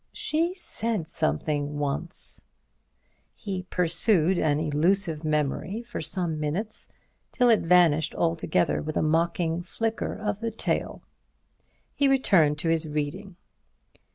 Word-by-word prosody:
She 335 +4 -1
said 225 - -1
something 145 - -1
once—" 145 +5 -3 0.9
He 185 -3 -5
pursued 180 +1 +4
an 150 -1 +1
elusive 160 +2 0
memory 155 - -1
for 240 - -6
some 160 0 -1
minutes, 180 +9 -3 0.4
till 245 -1 +3
it 225 - +5
vanished 165 -3 +3
altogether 165 -2 0
with 155 0 -4
a - - +1
mocking 165 +1 0
flicker 225 +5 -3
of 210 -1 -3
the 230 0 -2
tail. 225 - -3 0.9
He 280 - +2
returned 190 - +3
to 165 +2 -1
his 165 -1 +1
reading. 155 +6 -4
170 Hz, 120 wpm, -26 LUFS, 155-205 Hz, 0.9 s, it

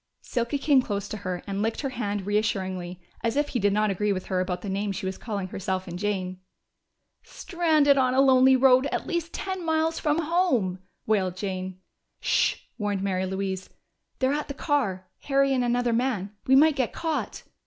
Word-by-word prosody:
Silky 235 +2 -1
came 280 -1 +4
close 205 -4 -3
to 215 - -5
her 185 -3 -4
and 200 0 -3
licked 225 +1 -1
her 275 - -2
hand 205 -6 -3
reassuringly, 190 -4 -1 0.2
as 230 0 0
if 290 0 +1
he 245 - -1
did 205 0 +2
not 210 0 +2
agree 210 +2 0
with 185 -2 -2
her 185 - -1
about 180 -1 -2
the - - -5
name 200 +1 -1
she 190 - -5
was 190 0 -2
calling 200 -4 -4
herself 190 -1 -3
and 175 0 -6
Jane. 185 -3 -2 0.8
"Stranded 310 -6 +2
on 255 -1 +2
a - - +4
lonely 265 -1 +6
road 260 +1 +5
at - - -3
least 340 -2 -2
ten 375 -2 -4
miles 320 0 +1
from 300 0 +1
home!" 305 - +1 0.3
wailed 190 -4 +1
Jane. 185 -1 -4 0.4
"Sh!" - - +2 0.2
warned 205 -2 -1
Mary 190 -1 0
Louise. 190 0 -3 0.5
"They're 260 +1 +1
at 300 0 -2
the 280 - -6
car 220 - -1 0.2
Harry 275 -1 +3
and 255 -2 +1
another 245 0 +1
man. 230 -5 0 0.2
We 265 - +6
might 300 +1 +5
be 255 -3 +2
caught!" 325 +4 -3
215 Hz, 190 wpm, -26 LUFS, 190-275 Hz, 0.8 s, lonely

